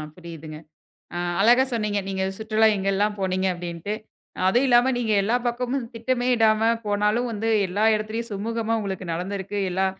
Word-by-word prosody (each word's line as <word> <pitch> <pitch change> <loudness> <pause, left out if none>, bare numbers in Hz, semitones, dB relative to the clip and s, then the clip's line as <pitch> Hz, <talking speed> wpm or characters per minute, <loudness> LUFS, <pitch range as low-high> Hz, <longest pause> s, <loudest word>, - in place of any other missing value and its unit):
புரியுதுங்க. 165 -3 -9 0.6
அ, - - -2 0.2
அழகா 240 +5 +6
சொன்னீங்க. 210 -3 0
நீங்க, 190 -1 -2 0.2
சுற்றுலா 220 0 +2
எங்கெல்லாம் 200 +2 0
போனீங்க, 185 0 0
அப்பிடின்ட்டு. 175 +2 -5 0.5
அ - - -4
அதுவும் 245 +8 +3
இல்லாம, 245 +1 +5
நீங்க 230 -3 0
எல்லா 220 +5 +2
பக்கமும் 250 +2 -2
திட்டமே 245 +2 -1
இடாம 220 -1 +3 0.2
போனாலும், 210 +4 +1
வந்து 225 +1 -2 0.2
எல்லா 200 +4 0
இடத்துலயும் 220 +2 -3
சுமூகமா 225 +2 -2
உங்களுக்கு 195 -2 -4
நடந்திருக்கு. 195 +3 -4
எல்லா 190 +2 +1
210 Hz, 150 wpm, -24 LUFS, 190-230 Hz, 0.6 s, அழகா